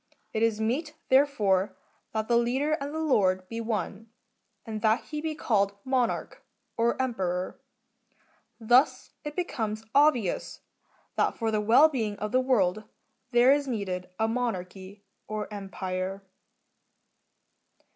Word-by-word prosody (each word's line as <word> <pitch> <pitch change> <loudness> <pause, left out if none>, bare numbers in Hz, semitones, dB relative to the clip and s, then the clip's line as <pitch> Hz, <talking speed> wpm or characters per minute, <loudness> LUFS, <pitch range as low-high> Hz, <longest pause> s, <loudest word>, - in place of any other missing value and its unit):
It 220 - -1
is 225 -1 +2
meet, 285 +8 -1
therefore, 210 -9 +3 0.3
that 220 0 -2
the 235 - +3
leader 250 +6 +1
and 280 +1 -4 0.2
lord 185 -7 +2
be 230 0 -4
one, 225 -1 -3 0.6
and 215 -1 -5
that 220 +2 +2
he 300 -1 -5
be 315 -1 -3
called 200 -8 +1
Monarch, 260 -2 -1 0.3
or 235 +2 +1
Emperor. 185 -8 -2 1.0
Thus 245 +5 +3
it 295 -1 -6
becomes 220 -11 -3
obvious 280 - +2 0.6
that - - +1
for 225 -2 0
the 215 -1 +1
well 235 +9 +6
being 225 -9 -2
of 210 0 -4
the 255 - +3
world 215 -6 +1 0.4
there 240 +1 +5
is 285 0 +2
needed 185 -6 -3
a 220 - +1
Monarchy, 200 -4 -4 0.2
or 215 0 -3
Empire. 190 -1 -4
225 Hz, 125 wpm, -28 LUFS, 200-255 Hz, 1.0 s, well